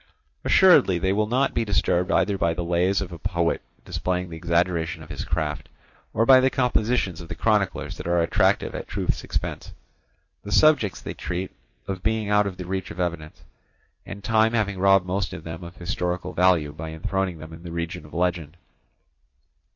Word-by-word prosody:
Assuredly 150 - +5
they 95 +3 +1
will 105 +1 +1
not 130 +4 +1
be 115 - +1
disturbed 90 -4 +1
either 100 +1 +2
by 85 -3 0
the 85 - -2
lays 90 +3 +1
of 95 - -5
a 85 - -8
poet 85 0 0 0.2
displaying 90 -1 -2
the - - -6
exaggeration 85 0 0
of 75 - -11
his 75 - -4
craft, 75 -3 -3 0.4
or 115 - +1
by 130 +1 +8
the 130 +1 +3
compositions 120 - 0
of 85 - -11
the - - -5
chroniclers - - 0
that - - -7
are 85 0 +2
attractive 85 0 +2
at - - -6
truth's - - -2
expense; - - -4 0.7
the 100 - -8
subjects 135 -7 +4
they - - -6
treat 90 +2 -4 0.4
of 95 -2 -4
being 110 -1 0
out 105 -1 +4
of 95 -2 -6
the 90 - -6
reach 95 +1 -3
of 90 - -9
evidence, 85 -3 -4 0.6
and 100 +1 -9
time 110 +1 +3
having 100 -4 0
robbed 95 -1 +4
most 90 0 -2
of 80 - -8
them 80 +1 -7
of 85 +1 -10
historical 90 0 -3
value 85 -5 +3
by 80 +1 -7
enthroning 90 +3 -2
them 80 +1 -10
in 80 - -11
the 85 -1 -8
region 85 -2 -4
of 75 - -14
legend. 85 -2 -2
90 Hz, 190 wpm, -24 LUFS, 85-100 Hz, 0.7 s, by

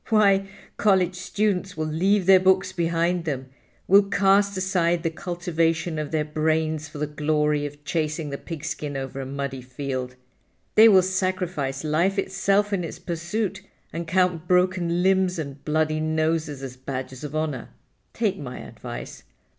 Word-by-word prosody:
Why, 200 -3 +4 0.3
college 190 -3 +3
students 190 0 -1
will 155 - -1
leave 185 +5 +2
their 190 0 +7
books 190 0 +3
behind 170 +1 0
them, 130 -4 -3 0.4
will 200 +2 +7
cast 200 0 +2
aside 175 -3 +1
the 165 - 0
cultivation 165 -2 -1
of 150 -1 -3
their 155 -1 0
brains 155 0 0
for 150 - -10
the 150 - -1
glory 150 0 0
of 145 0 -13
chasing 155 -1 -2
the 140 - -4
pigskin 150 -3 -5
over 135 0 -5
a 130 - -5
muddy 140 -1 -4
field. 130 0 -5 0.6
They 225 +1 +8
will 190 -3 +6
sacrifice 180 -7 -1
life 170 +6 +1
itself 195 +1 +1
in 185 -3 0
its 165 - -6
pursuit 175 +5 -3 0.3
and 170 0 -4
count 180 -1 +1
broken 180 -1 +2
limbs 190 -1 +3
and 140 -3 -6
bloody 155 0 +1
noses 155 -2 -1
as 125 -1 -7
badges 130 0 -6
of 150 0 -6
honor. 155 -6 -2 0.4
Take - - -1
my - - -6
advice. - - -8
165 Hz, 155 wpm, -24 LUFS, 150-185 Hz, 0.6 s, They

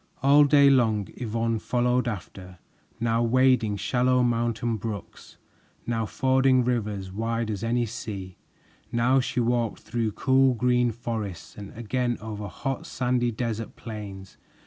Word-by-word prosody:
All 145 +2 +7
day 140 -1 +6
long 110 -6 +2
Yvonne 115 -1 -1
followed 125 +1 +1
after, 95 -3 -7 0.4
now 115 0 +1
wading 120 -3 +3
shallow 125 +5 +2
mountain 115 -1 0
brooks, 105 -2 -7 0.5
now 115 -2 -1
fording 130 0 +3
rivers 105 -6 -2
wide 115 +2 -2
as 100 0 -4
any 120 +1 +1
sea. 100 -5 -7 0.6
Now 120 +3 +3
she 125 0 -2
walked 120 -2 0
through 115 -2 -2
cool 130 +2 +3
green 125 0 +2
forests 110 -6 -5
and 100 -1 -9
again 120 +1 -1
over 105 0 -6
hot, 135 +4 -4
sandy 125 -1 0
desert 115 -1 -4
plains. 100 -4 -8
115 Hz, 130 wpm, -26 LUFS, 110-125 Hz, 0.6 s, All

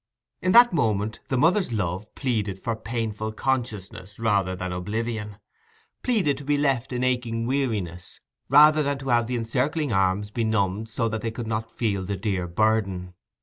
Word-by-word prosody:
In 185 - +2
that 240 -2 +8
moment 110 - 0
the 130 - 0
mother's 175 +2 +3
love 100 -1 -3
pleaded 110 -8 -1
for 115 +2 -2
painful 110 -1 -3
consciousness 105 -6 -3
rather 100 -5 +1
than 90 0 -4
oblivion—pleaded 130 - -3
to - - -8
be 145 +1 +1
left 135 -3 0
in 125 0 -1
aching 120 -3 0
weariness, 110 -10 -2 0.3
rather 150 +2 +7
than 140 -1 0
to 135 0 -6
have 120 -1 +3
the 125 - -2
encircling 130 +4 -1
arms 95 +2 +1
benumbed 110 -2 0
so 115 +1 0
that 110 -1 -3
they 115 - -2
could 115 +1 -6
not 110 0 -3
feel 105 -5 -1
the 100 +1 -3
dear 95 -3 -2
burden. 95 -1 0
115 Hz, 160 wpm, -25 LUFS, 100-135 Hz, 0.3 s, that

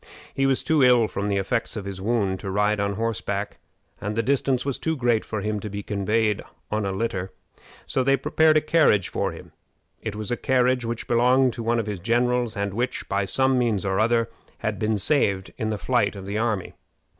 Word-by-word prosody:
He 135 0 +1
was 135 -1 +1
too 160 -2 +2
ill 125 -3 +5
from 100 -1 -3
the 100 -1 0
effects 100 +5 -1
of 100 - -5
his 95 -1 -6
wound 100 -3 0
to 100 - -5
ride 105 +2 +1
on 100 0 0
horseback, 100 -2 -3 0.4
and 105 +1 -3
the 115 - +1
distance 135 0 +1
was 140 -2 -2
too 160 0 -1
great 120 -5 +1
for 110 -2 -4
him 105 0 -2
to 105 - -6
be 100 0 -5
conveyed 105 +1 0 0.3
in 105 -1 0
a - - -1
litter. 95 -2 -2 0.5
So 130 - 0
they 135 +1 +3
prepared 155 +3 +3
a - - +3
carriage 155 - +3
for - - -1
him. - - -12 0.5
It 110 - -4
was 105 +2 -4
a 120 - 0
carriage 125 -1 +2
which 115 0 -4
belonged 125 +2 +3
to - - -6
one 115 +1 +1
of 115 - -1
his 105 -3 -4
generals, 120 +2 +1
and 100 -1 -2
which, 120 +4 -2
by 100 0 0
some 130 +6 +2
means 110 -6 0
or 95 -1 0
other, 115 +1 +2 0.3
had 105 -2 -3
been 110 0 +1
saved 100 -6 +1
in 110 - -2
the 105 - -1
flight 120 -3 +1
of 95 -1 -8
the 100 +2 -2
army. 110 -5 -1
110 Hz, 215 wpm, -24 LUFS, 100-125 Hz, 0.5 s, ill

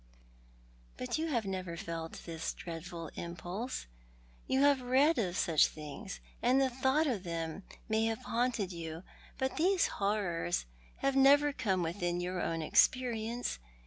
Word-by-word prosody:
"But 125 - -2
you 325 - 0
have 240 -8 0
never 185 -3 -3
felt 165 -1 -5
this 165 -1 -3
dreadful 165 -1 -7
impulse— 175 +8 -5 0.6
yoii 265 +1 +3
have 285 -2 +5
read 265 +5 +4
of 185 -5 -1
such 160 -3 +4
things, 155 +7 -8 0.2
and 250 +3 +4
the 265 -1 +2
thought 265 +5 +2
of 240 -10 0
them 165 0 -4 0.3
may 220 0 +2
have 225 +3 -2
haunted 235 -5 0
you 165 -1 -6 0.2
— - - -23
but 265 0 -1
these 365 +3 +4
horrors 190 -4 0 0.4
have 275 0 +2
never 285 +2 +6
come 195 -9 0
within 175 +1 -1
your 180 0 -2
own 165 -1 -1
experience. 235 - +2
205 Hz, 145 wpm, -33 LUFS, 170-260 Hz, 0.6 s, never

